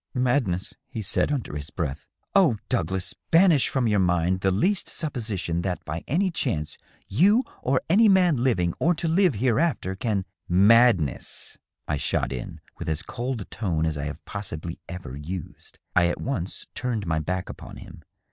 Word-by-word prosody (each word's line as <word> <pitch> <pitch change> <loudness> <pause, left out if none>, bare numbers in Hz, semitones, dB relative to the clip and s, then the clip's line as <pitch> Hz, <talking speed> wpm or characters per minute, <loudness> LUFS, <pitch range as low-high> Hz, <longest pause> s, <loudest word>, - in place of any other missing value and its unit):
" - - -55
Madness," 125 -8 0 0.2
he 110 - -5
said, 105 +8 +1
under 130 - -3
his 75 +1 -5
breath. 75 -7 -4
" - - -46
Oh, 170 - +5
Douglas, 95 -6 0 0.2
banish 165 -5 +5
from 130 -3 0
your 105 -2 +2
mind 90 0 +2
the 95 - +2
least 180 - +1
supposition 110 - -2
that 90 -1 -3
by 80 +2 -4
any 185 +7 +1
chance 75 - -2 0.3
you 200 - +4 0.2
or 130 +1 +1
any 215 +6 +5
man 180 -6 +4
living 95 -9 +1
or 175 +2 +3
to 165 - -2
live 175 - +3
hereafter 125 - +1
can 100 -2 -1
" - - -66
" - - -39 0.2
Madness," 115 - +2 0.3
I 75 - 0
shot 65 - 0
in, 60 - -6 0.2
with - - -4
as 80 +1 -1
cold 120 +2 -4
a - - -6
tone 85 -8 -1
as 80 -1 -1
I 70 0 -3
have 75 - -7
possibly 85 -5 -5
ever 90 -8 -7
used. 80 +4 -8 0.2
I 85 -1 +5
at 85 - -2
once 100 -9 -3
turned 120 -5 -2
my 80 -2 0
back 90 +4 -3
upon - - -9
him. - - -11
100 Hz, 185 wpm, -25 LUFS, 85-135 Hz, 0.3 s, Oh